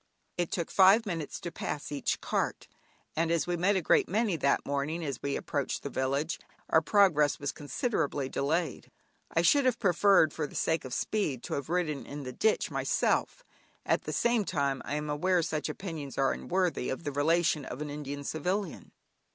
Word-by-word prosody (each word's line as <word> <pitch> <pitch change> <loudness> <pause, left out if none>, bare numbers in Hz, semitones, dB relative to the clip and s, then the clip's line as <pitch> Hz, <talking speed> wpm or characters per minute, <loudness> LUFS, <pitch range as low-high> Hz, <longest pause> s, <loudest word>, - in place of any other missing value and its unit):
It 175 -2 -1
took 170 -3 -3
five 195 +4 +6
minutes 165 -6 -4
to 175 - -5
pass 150 -3 -5
each 145 -2 -1
cart, - - -2 0.5
and 165 +1 +1
as 165 -1 +1
we 175 - -1
met 185 +4 +2
a 185 - 0
great - - +3
many 210 0 +1
that 140 -3 +1
morning 145 +4 -2
as 135 -4 -4
we 140 0 -1
approached 140 -3 -2
the 140 - -4
village, 140 +5 -1 0.3
our 160 - +6
progress 160 -6 +3
was 145 - -2
considerably 145 - -2
delayed. 155 +3 -1 0.4
I 165 - +1
should 285 +11 +5
have 255 -3 +3
preferred 190 -5 +4
for 150 -2 -2
the - - -14
sake 160 -3 0
of 130 - -6
speed 150 - -1
to - - -5
have 140 0 -3
ridden 165 -5 -1
in 145 0 -6
the 130 -1 -6
ditch 220 - +1
myself; - - 0 0.4
at - - +1
the - - -3
same 235 -2 +2
time 140 -7 -1
I 145 - -2
am 150 0 -3
aware 175 +4 +1
such 155 -1 -2
opinions 155 -4 -6
are 135 0 +3
unworthy 180 -7 -1
of 135 - -4
the 145 - -2
relation 155 +1 +2
of 125 0 -7
an 150 -1 -4
Indian 145 -1 -5
Civilian. 180 +5 -3
160 Hz, 190 wpm, -30 LUFS, 145-180 Hz, 0.5 s, five